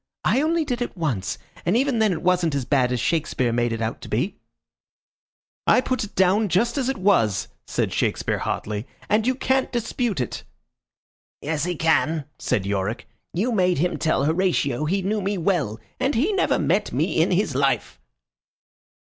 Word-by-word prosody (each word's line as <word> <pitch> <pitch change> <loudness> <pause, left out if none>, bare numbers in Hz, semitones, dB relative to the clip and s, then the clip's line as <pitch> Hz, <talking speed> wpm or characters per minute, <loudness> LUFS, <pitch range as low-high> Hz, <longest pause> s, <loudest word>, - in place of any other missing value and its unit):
"I 265 - +3
only 320 +1 +1
did 250 -4 -2
it 240 - -3
once, 130 - -2 0.3
and 180 +6 +2
even 265 -2 +1
then 215 -2 +3
it 170 -2 -3
wasn't 180 -4 +2
as 135 -3 -1
bad 125 -2 +2
as 125 - 0
Shakespeare 130 -4 0
made 120 0 +1
it 115 0 -2
out 110 - -3
to - - -9
be." 125 - -1 1.3
"I - - +6
put 255 -1 -1
it 210 - -8
down 195 +3 +3
just 210 +7 +2
as 265 -3 0
it 270 - -1
was," 185 - +2 0.2
said - - -1
Shakespeare, - - 0
hotly, 105 +4 -3 0.2
"and 215 +2 +2
you 255 - +2
can't 265 0 +1
dispute 235 - -1
it." 125 - -3 1.0
"Yes, 150 +1 -1
he 180 0 -2
can," 160 -1 +1
said 95 - 0
Yorick. 100 +3 -2 0.2
"You 215 +9 0
made 185 -5 +2
him 175 +5 0
tell 155 -4 +1
Horatio 155 -4 +1
he 190 +5 0
knew 210 +2 0
me 200 +1 -1
well, 160 - 0 0.2
and 275 - +1
he 310 - +2
never 385 - +2
met - - +1
me - - +1
in - - +3
his 185 -3 +1
life." 135 - 0
180 Hz, 180 wpm, -23 LUFS, 135-220 Hz, 1.3 s, I